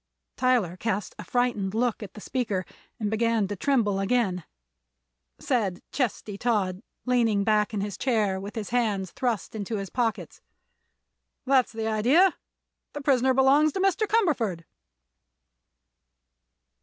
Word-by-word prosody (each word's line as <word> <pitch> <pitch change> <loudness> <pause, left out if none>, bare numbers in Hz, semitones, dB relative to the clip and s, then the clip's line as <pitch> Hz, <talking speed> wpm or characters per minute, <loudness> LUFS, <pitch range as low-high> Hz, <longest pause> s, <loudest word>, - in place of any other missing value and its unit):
Tyler 240 -9 +1
cast 210 -1 -2
a - - -5
frightened 240 -6 -1
look 235 0 0
at 200 -3 -9
the 210 - -9
speaker 210 -8 -2 0.3
and 210 -2 -1
began 225 -2 +1
to 205 - -4
tremble 210 -4 +1
again. 195 -5 0 0.9
Said 200 -8 -1
Chesty 215 -6 -2
Todd, 200 -6 0 0.2
leaning 230 -5 +2
back 210 0 +2
in 210 -3 -2
his 205 -1 -5
chair 215 -7 +1
with 200 +3 -8
his 220 -2 -5
hands 210 -7 0
thrust 245 -5 -2
into 215 0 -4
his 195 -2 -5
pockets: 235 -4 -2 1.0
"That's 265 -2 +3
the 225 0 -4
idea. 250 - +4 0.6
The 290 - -5
prisoner 265 -2 +3
belongs 280 +3 +4
to 385 - -3
Mr. 390 +3 +2
Cumberford." 270 - +1
225 Hz, 130 wpm, -26 LUFS, 200-255 Hz, 1.0 s, idea